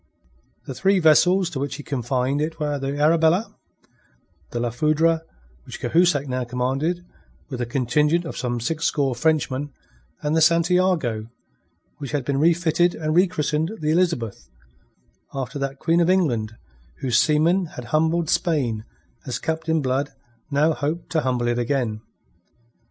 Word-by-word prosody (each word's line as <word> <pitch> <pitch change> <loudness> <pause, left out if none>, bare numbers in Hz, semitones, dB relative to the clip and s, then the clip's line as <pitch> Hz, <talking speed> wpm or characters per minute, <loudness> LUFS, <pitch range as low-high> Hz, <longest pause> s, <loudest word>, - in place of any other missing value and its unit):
The - - -5
three 195 0 +2
vessels 180 +2 +4
to 135 - -4
which 140 0 -3
he 145 - -8
confined 130 +1 -1
it 160 +1 -3
were 145 -2 -1
the 135 +1 -3
Arabella, 160 +6 +3 0.9
the 120 - -4
La 120 0 -1
Foudre, 155 +5 +2 0.5
which - - -8
Cahusac 165 -5 +2
now 130 -1 -2
commanded 135 +8 -2 0.5
with 125 - -4
a 120 - -2
contingent 150 +7 +1
of 165 - -6
some 120 -1 -2
sixscore 145 -1 0
Frenchmen, 145 0 0 0.5
and 150 +1 0
the 160 - +3
Santiago, 170 -8 +2 0.7
which 140 -1 -6
had 140 -4 -1
been 140 -1 0
refitted 170 +1 +2
and 155 0 -2
rechristened 165 -1 +1
the 155 0 0
Elizabeth, 165 - -1 0.9
after 135 +1 -4
that 140 0 -3
Queen 165 +4 +1
of 170 - +2
England 120 - +1 0.5
whose 125 -2 +2
seamen 165 +7 +2
had 125 - -6
humbled 160 +2 +2
Spain 130 - 0 0.4
as 125 - -2
Captain 160 -1 -1
Blood 135 +2 -1 0.4
now 150 +3 +2
hoped 155 +4 -4
to 160 - +1
humble 125 -3 -1
it 120 0 0
again. 120 -4 -1
150 Hz, 145 wpm, -23 LUFS, 130-165 Hz, 0.9 s, vessels